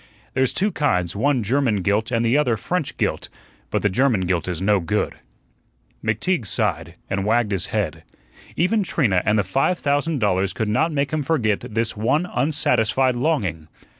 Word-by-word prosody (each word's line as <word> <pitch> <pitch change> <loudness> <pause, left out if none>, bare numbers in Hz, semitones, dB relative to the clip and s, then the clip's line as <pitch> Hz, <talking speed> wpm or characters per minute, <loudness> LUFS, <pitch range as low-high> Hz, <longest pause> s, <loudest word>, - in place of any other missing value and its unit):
There's 130 0 +2
two 205 +2 0
kinds, 90 - 0
one 130 +2 +1
German 115 -3 +1
gilt 105 +3 +1
and 115 -1 0
the 115 +3 +2
other 125 -6 +2
French 170 - -3
gilt; - - -2 0.4
but - - -1
the - - +4
German 115 +1 +2
gilt 90 -2 -1
is 90 -3 -3
no 100 +1 +2
good." 100 +5 -1 0.9
McTeague 115 - 0
sighed, - - -1
and 95 0 -2
wagged 110 +1 +1
his 95 -4 0
head. - - -2 0.5
Even 205 +6 +2
Trina 120 - +1
and 105 +1 +3
the 105 - +2
five 135 - +1
thousand 145 +2 0
dollars 95 -4 +1
could 110 +1 -2
not 160 +10 +1
make 140 -1 -1
him 155 - 0
forget 130 -9 +1
this 115 -2 -3
one 120 +11 +1
unsatisfied 130 -5 +1
longing. 105 - -1
115 Hz, 170 wpm, -22 LUFS, 100-145 Hz, 0.9 s, the